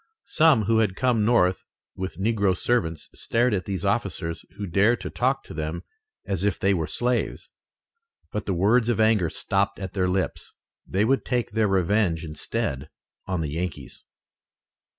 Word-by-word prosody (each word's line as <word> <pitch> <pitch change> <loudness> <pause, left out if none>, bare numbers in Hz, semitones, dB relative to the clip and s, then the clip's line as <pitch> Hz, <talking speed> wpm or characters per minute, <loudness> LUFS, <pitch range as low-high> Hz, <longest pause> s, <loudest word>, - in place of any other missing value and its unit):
Some 155 -8 +4
who 110 +2 +2
had 105 -4 +1
come 120 -3 +2
north 95 -6 +3 0.3
with 95 -3 -5
negro 100 -2 +1
servants 85 -11 0
stared 120 0 +1
at 90 -4 -1
these 95 -4 -3
officers 80 0 -1
who 105 - -4
dared 100 +7 +3
to - - -5
talk 135 +2 0
to - - -11
them 80 +2 -4 0.4
as 95 -2 -2
if 105 -1 +1
they 100 +1 +2
were 80 -4 -1
slaves. 120 0 -2 0.8
But 105 - -4
the 95 - 0
words 110 +7 +3
of 120 - +1
anger 110 -6 +3
stopped 100 +3 0
at 95 -2 -6
their 95 -2 +1
lips. 95 0 -2 0.3
They 100 +3 +1
would 135 +3 +2
take 120 -5 -1
their 110 0 +2
revenge 95 -3 +1
instead 75 -2 -3 0.4
on 90 -2 -1
the 75 - -2
Yankees. 85 +3 -5
100 Hz, 165 wpm, -25 LUFS, 90-115 Hz, 0.8 s, Some